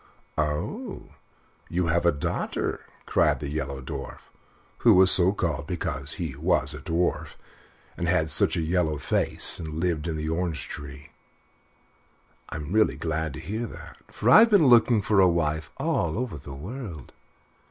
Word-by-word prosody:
"Oh! 75 -1 -3 0.6
you 90 +1 0
have 85 +1 +1
a - - +6
daughter," 70 - -2 0.3
cried - - +2
the 70 -1 -5
Yellow 70 -3 -4
Dwarf - - -6 0.6
(who 115 -4 +6
was 95 0 +6
so 90 0 +4
called 85 -8 -2
because 70 +2 -3
he 80 -8 -5
was 75 -2 +1
a 75 - -7
dwarf 85 0 -1 0.6
and 85 - -3
had 80 -3 +1
such 70 - +2
a - - 0
yellow 80 -2 0
face, - - 0
and 80 -2 -6
lived 85 -2 -1
in 80 -2 -2
the 75 0 -3
orange 80 0 -2
tree). 70 0 -9 1.4
"I'm 75 +1 -6
really 110 +1 +3
glad 80 -2 -2
to - - -7
hear 110 +3 -4
that, - - -11
for 115 +4 0
I've 225 - +8
been 200 -8 +5
looking 120 -3 +5
for 105 0 +2
a 95 - +7
wife 80 -3 0
all 85 +2 0
over 125 -7 -3
the 70 0 -9
world. 90 - -8
80 Hz, 160 wpm, -26 LUFS, 75-95 Hz, 1.4 s, I've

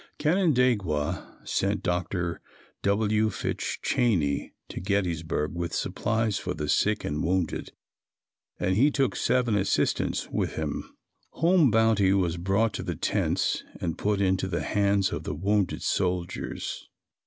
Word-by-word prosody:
Canandaigua 125 - +1
sent 100 +2 0
Dr. 90 -1 -1 0.4
W. 105 +2 +2
Fitch - - -3
Cheney 85 - +1 0.2
to - - -6
Gettysburg 85 -6 -1
with 85 0 -3
supplies 110 -2 0
for 90 -1 -4
the 75 -1 -3
sick 105 +7 +1
and 75 +1 -2
wounded 90 -1 -1 0.9
and 95 +1 +1
he 135 +8 +5
took 135 -3 0
seven 125 -3 +1
assistants 100 0 0
with - - -1
him. 80 -2 -3 0.4
Home 170 -3 +4
bounty 110 -3 +4
was 90 -4 +1
brought 100 +5 +1
to - - -3
the - - -3
tents - - 0 0.2
and 85 -2 -2
put 105 -1 0
into 95 -1 +1
the 85 -2 -2
hands 100 -2 +2
of - - -3
the 75 - -4
wounded 100 +3 0
soldiers. 90 -2 -2
100 Hz, 130 wpm, -27 LUFS, 85-110 Hz, 0.9 s, he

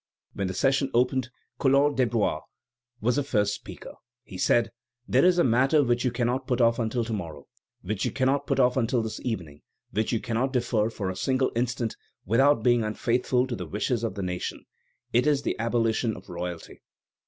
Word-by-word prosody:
When 100 - -2
the 95 - -4
session 135 +3 +2
opened, 125 +1 +2 0.3
Collot 140 +1 +3
d'Herbois 115 -10 +1 0.6
was 125 +4 +1
the 145 - +1
first 105 -6 +1
speaker. 105 - -9 0.3
He 95 - -12
said: 115 +5 +2 0.4
"There 130 - +3
is 180 0 +5
a 175 - +4
matter 135 +5 +3
which 120 -1 +1
you 125 - +2
cannot 125 +2 -1
put 125 -2 0
off 115 0 +3
until 115 +1 0
to 115 0 -4
morrow, 80 -8 -6 0.4
which 105 +2 -3
you - - +1
cannot 140 +2 0
put 135 -1 0
off 125 0 +3
until 120 -1 +1
this 110 - -5
evening, 85 - -5 0.3
which 110 +1 -1
you 115 - +1
cannot 120 +4 -1
defer 115 -3 +1
for 100 -4 -3
a - - -7
single 130 +7 0
instant 120 -1 -1 0.3
without 115 +4 +3
being 120 -1 +3
unfaithful 125 +3 0
to 130 -2 -4
the 90 -5 -6
wishes 110 - -1
of 110 -4 -2
the 100 - -4
nation; 90 -1 -4 0.5
it 125 +5 +3
is 145 -2 +2
the - - -1
abolition 115 -1 0
of - - -14
royalty." 85 -1 -6
120 Hz, 190 wpm, -26 LUFS, 110-130 Hz, 0.6 s, is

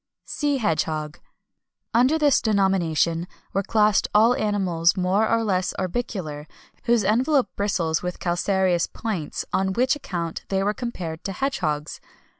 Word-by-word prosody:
SEA 290 -2 -1
HEDGEHOG. 155 - -1 0.7
Under 255 +7 +4
this 295 -3 +3
denomination 180 -5 +1 0.3
were 195 - +1
classed 210 0 +2
all 225 +3 +6
animals, 190 -6 +1
more 190 +4 +2
or 230 0 +2
less 185 -4 0
orbicular, 180 -6 -4 0.4
whose 235 -2 +3
envelope 255 +7 +2
bristles 180 -6 0
with 180 0 -4
calcareous 180 0 +1
points, 200 -10 -4
on 190 0 +1
which 255 +6 +2
account 170 - -5
they 195 0 0
were 205 +1 +1
compared 180 -10 -5
to 195 - -3
hedgehogs. 155 - -2
195 Hz, 130 wpm, -24 LUFS, 170-230 Hz, 0.7 s, all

